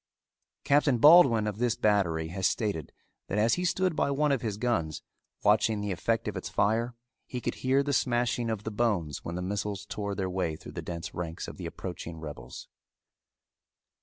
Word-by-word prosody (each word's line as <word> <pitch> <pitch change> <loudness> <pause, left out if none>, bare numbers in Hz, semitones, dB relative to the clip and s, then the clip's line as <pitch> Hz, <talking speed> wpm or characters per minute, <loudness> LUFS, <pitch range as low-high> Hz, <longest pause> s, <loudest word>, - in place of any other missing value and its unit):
Captain 140 -2 +3
Baldwin 135 -6 +7
of 105 0 -3
this 120 -2 +1
battery 85 -8 +1
has 95 +1 +1
stated 100 - -2 0.4
that 100 - -2
as 110 +2 +3
he 180 - 0
stood 180 -1 +1
by - - +1
one 145 +1 +2
of 135 -4 +1
his 110 -4 -3
guns, 105 -10 -1 0.4
watching 105 +1 +3
the 105 -1 -2
effect 115 +5 -1
of 105 - -3
its 95 - -4
fire, 115 +3 +1 0.3
he 125 - -4
could - - -2
hear 135 +2 +3
the 145 0 -1
smashing 120 -2 +1
of 110 -2 -3
the 110 - -4
bones 100 - -1
when 85 - -5
the 90 - -3
missiles 100 +1 -3
tore 100 -1 -4
their 95 -2 -1
way 90 -4 -1
through 85 - -11
the 85 - -5
dense 85 +1 -6
ranks 85 -2 -5
of - - -8
the - - -5
approaching 80 -1 -7
rebels. 75 -5 -8
105 Hz, 190 wpm, -29 LUFS, 90-120 Hz, 0.4 s, Baldwin